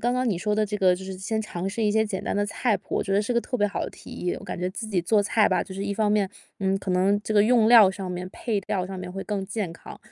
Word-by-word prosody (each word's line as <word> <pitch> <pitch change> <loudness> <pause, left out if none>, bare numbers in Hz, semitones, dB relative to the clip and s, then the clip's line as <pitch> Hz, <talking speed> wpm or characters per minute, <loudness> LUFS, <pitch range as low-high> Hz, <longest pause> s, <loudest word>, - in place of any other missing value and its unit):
刚 245 +1 +1
刚 255 0 +1
你 195 -6 0
说 210 +3 0
的 215 0 +2
这 210 0 -3
个 185 -3 +4
就 185 +1 -8
是 190 - -6
先 220 +3 -2
尝 185 -3 -4
试 225 +3 -3
一 210 - +3
些 220 +1 +3
简 195 -3 -4
单 - - -1
的 205 - +1
菜 220 0 0
谱， 185 - -7
我 - - +1
觉 195 - -3
得 200 - +4
是 220 +4 -1
个 235 - +2
特 250 - -3
别 205 -3 +2
好 205 - -3
的 - - -5
提 - - -13
议。 180 - -3
我 - - -12
感 180 - -5
觉 180 - -1
自 220 +3 -6
己 195 -4 0
做 205 +4 +3
菜 210 +1 +3
吧， - - +1
就 190 - -9
是 195 +1 -4
一 205 - -1
方 210 0 +1
面， 210 -2 +2 0.3
嗯， 195 0 +1
可 195 - -4
能 195 +3 +2
这 215 - -3
个 205 - +6
用 225 0 +4
料 225 -5 +8
上 190 -1 -6
面、 180 0 -5
配 220 -4 -2
料 190 -3 -1
上 190 -1 -6
面 180 0 -6
会 195 0 -5
更 200 -2 -2
健 200 -5 -3
康， - - -11
205 Hz, 355 characters per minute, -25 LUFS, 190-215 Hz, 0.3 s, 料